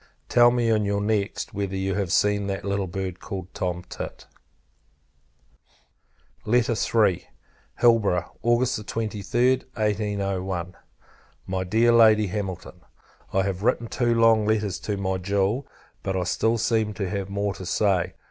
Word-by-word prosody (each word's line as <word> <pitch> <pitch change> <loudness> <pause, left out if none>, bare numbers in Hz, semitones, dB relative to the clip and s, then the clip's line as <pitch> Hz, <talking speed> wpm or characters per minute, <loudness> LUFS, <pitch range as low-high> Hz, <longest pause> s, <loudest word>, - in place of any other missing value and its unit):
Tell 120 0 +6
me, 120 -1 +1
in 110 -1 +2
your 100 0 0
next, 105 -1 -1
whether 100 -1 -3
you 95 0 -1
have 95 -2 -2
seen 105 -1 +2
that 100 0 -4
little 100 -1 -1
bird, 95 0 -5
called 95 -2 -7
Tom 90 -3 -3
Tit. - - -7 2.2
III. 115 -4 +2 0.5
Hilborough, 105 -7 +3
August 120 -1 +1
23d, 115 +4 0
1801. 100 -4 -2 0.7
MY 95 0 -2
DEAR 115 +5 +3
LADY 110 -2 +6
HAMILTON, 95 -3 -5 0.5
I 95 - +2
have 95 -1 -3
written 115 +1 +1
two 120 0 0
long 115 -2 +4
letters 105 -5 0
to 100 +3 -3
my 95 -1 -1
jewel, 100 +7 0 0.3
but 95 -1 -2
I 90 - 0
still 110 +6 +1
seem 110 -2 0
to 100 -1 -2
have 100 0 -3
more 100 0 -1
to 95 - -9
say. 95 -2 +1
100 Hz, 140 wpm, -25 LUFS, 95-110 Hz, 2.2 s, Tell